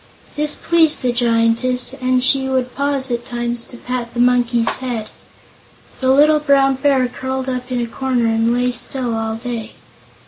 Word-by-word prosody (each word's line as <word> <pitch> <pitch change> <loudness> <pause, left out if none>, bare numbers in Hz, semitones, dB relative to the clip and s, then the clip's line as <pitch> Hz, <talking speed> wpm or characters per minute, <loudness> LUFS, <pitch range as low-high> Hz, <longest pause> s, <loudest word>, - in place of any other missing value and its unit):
This 295 0 0
pleased 325 -4 +3
the 250 - +2
Giantess 240 +2 +1
and 255 0 +1
she 265 0 +2
would 255 -1 -1
pause 280 -2 -1
at 240 0 -2
times 240 -1 -4
to 245 - -11
pat 245 -1 -5
the - - -3
Monkey's 245 -1 +2
head. 240 -4 -4 0.9
The 260 - 0
little 300 +3 +5
Brown 275 -2 +3
Bear 265 -2 +2
curled 260 +1 -4
up 250 0 -4
in 250 - -1
a 240 - -1
corner 250 0 -1
and 225 +1 +1
lay 245 +1 +1
still 245 0 -2
all 225 0 -2
day. 230 -1 -6
250 Hz, 170 wpm, -18 LUFS, 235-265 Hz, 0.9 s, little